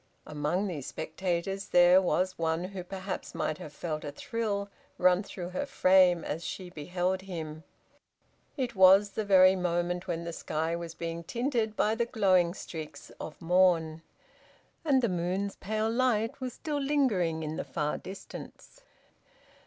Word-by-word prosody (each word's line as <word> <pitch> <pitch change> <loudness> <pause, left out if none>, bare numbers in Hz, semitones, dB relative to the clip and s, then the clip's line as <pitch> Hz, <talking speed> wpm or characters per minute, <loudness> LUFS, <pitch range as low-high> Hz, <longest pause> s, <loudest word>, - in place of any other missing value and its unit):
Among 150 +6 -1
these 160 -9 -4
spectators 190 +2 -3
there 175 +1 +6
was 185 0 0
one 165 +1 0
who 185 0 -6
perhaps 190 +1 -6
might 155 - -2
have 150 - -8
felt 155 0 -4
a 145 - -5
thrill 205 +4 -3 0.3
run 180 +1 +4
through 180 -3 -7
her 235 +11 -3
frame 185 -6 +4
as 160 +3 -4
she 180 0 -6
beheld 180 +4 -2
him. 160 -5 -6 0.9
It 250 -3 -2
was 190 +2 +7
the 215 - -2
very 190 -2 +6
moment 175 0 -1
when 170 -1 -2
the 170 0 -5
sky 160 +1 -2
was 170 -1 -6
being 170 0 -5
tinted 235 - -1
by 215 - +2
the 235 +1 0
glowing 185 -6 +3
streaks 155 -5 -8
of 155 - -7
morn, 165 -2 +3 0.8
and 275 -5 +3
the - - +4
moon's 185 +2 -2
pale 215 +2 -1
light 235 0 +1
was 255 -2 -3
still 300 -2 -3
lingering 215 - +1
in 155 0 -4
the - - -2
far 150 -2 -2
distance. 195 - -10
185 Hz, 155 wpm, -29 LUFS, 170-200 Hz, 0.9 s, was